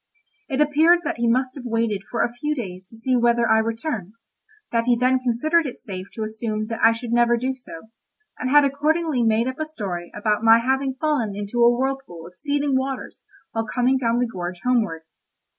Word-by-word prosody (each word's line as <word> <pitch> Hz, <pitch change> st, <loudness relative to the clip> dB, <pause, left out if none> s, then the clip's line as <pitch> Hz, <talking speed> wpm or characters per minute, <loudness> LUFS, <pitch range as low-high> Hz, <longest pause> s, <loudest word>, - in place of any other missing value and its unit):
It 270 Hz, -1 st, -2 dB
appeared 315 Hz, +4 st, +4 dB
that 295 Hz, -, -3 dB
he 235 Hz, 0 st, 0 dB
must 255 Hz, +2 st, +1 dB
have 270 Hz, -, -9 dB
waited 230 Hz, -3 st, 0 dB
for 240 Hz, -, 0 dB
a 235 Hz, -, -2 dB
few 300 Hz, +5 st, -2 dB
days 185 Hz, -7 st, -6 dB
to 225 Hz, -, -15 dB
see 255 Hz, +3 st, +1 dB
whether 235 Hz, -1 st, +3 dB
I 220 Hz, 0 st, +4 dB
returned, 225 Hz, -, -3 dB, 0.6 s
that 230 Hz, -1 st, +1 dB
he 240 Hz, -1 st, +3 dB
then 255 Hz, +2 st, +3 dB
considered 290 Hz, +7 st, +1 dB
it 250 Hz, -, -8 dB
safe 190 Hz, -2 st, -7 dB
to 220 Hz, -, -3 dB
assume 215 Hz, 0 st, -3 dB
that 225 Hz, -, -4 dB
I 225 Hz, -, +7 dB
should 230 Hz, +1 st, -5 dB
never 240 Hz, 0 st, +3 dB
do 260 Hz, +3 st, -1 dB
so, 220 Hz, -6 st, -12 dB, 0.5 s
and 255 Hz, -, -2 dB
had 290 Hz, +1 st, +6 dB
accordingly 300 Hz, 0 st, 0 dB
made 225 Hz, +1 st, +2 dB
up 260 Hz, +2 st, -4 dB
a 310 Hz, -, -1 dB
story 190 Hz, -, -5 dB
about 210 Hz, 0 st, 0 dB
my 225 Hz, 0 st, +7 dB
having 265 Hz, +2 st, 0 dB
fallen 265 Hz, -9 st, -1 dB
into 205 Hz, +4 st, -1 dB
a 235 Hz, -, +7 dB
whirlpool 255 Hz, -9 st, -2 dB
of 180 Hz, +1 st, -13 dB
seething 285 Hz, +2 st, -1 dB
waters 265 Hz, 0 st, -3 dB, 0.3 s
while 225 Hz, 0 st, -2 dB
coming 255 Hz, +3 st, +1 dB
down 235 Hz, -2 st, +1 dB
the 245 Hz, -, +2 dB
gorge 180 Hz, -5 st, -6 dB
homeward. 220 Hz, -10 st, 0 dB
240 Hz, 205 wpm, -23 LUFS, 220-265 Hz, 0.6 s, I